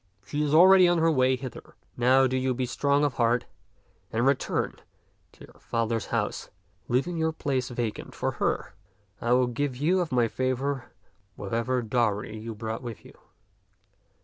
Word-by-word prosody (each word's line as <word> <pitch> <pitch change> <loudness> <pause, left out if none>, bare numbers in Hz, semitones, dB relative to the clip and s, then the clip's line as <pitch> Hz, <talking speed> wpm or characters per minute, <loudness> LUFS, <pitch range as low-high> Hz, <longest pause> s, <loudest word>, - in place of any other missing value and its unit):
She 145 +9 -3
is 150 -1 0
already 185 +3 +7
on 175 0 +3
her 165 0 +3
way 130 -3 +3
hither. 130 0 -9 0.2
Now 130 +2 +4
do 130 0 0
you 130 -1 0
be 130 +1 -1
strong 140 +3 +1
of 145 - 0
heart 120 0 +1 0.7
and 115 +2 0
return 135 -1 0 0.6
to - - -14
your - - -20
father's 115 -1 -2
house, - - -2 0.4
leaving 140 +8 0
your 160 0 +1
place 135 -5 -2
vacant 120 -3 -4
for - - -1
her. - - -1 0.5
I 120 +1 +2
will 125 0 +4
give 125 +2 -2
you 170 +7 +2
of 175 -5 -2
my 120 -2 +3
favor 130 +1 -2 0.4
whatever 115 +5 -1
dowry 110 -2 0
you 110 +1 -7
brought 110 +1 -5
with 120 -4 -8
you. - - -14
130 Hz, 165 wpm, -27 LUFS, 115-140 Hz, 0.7 s, already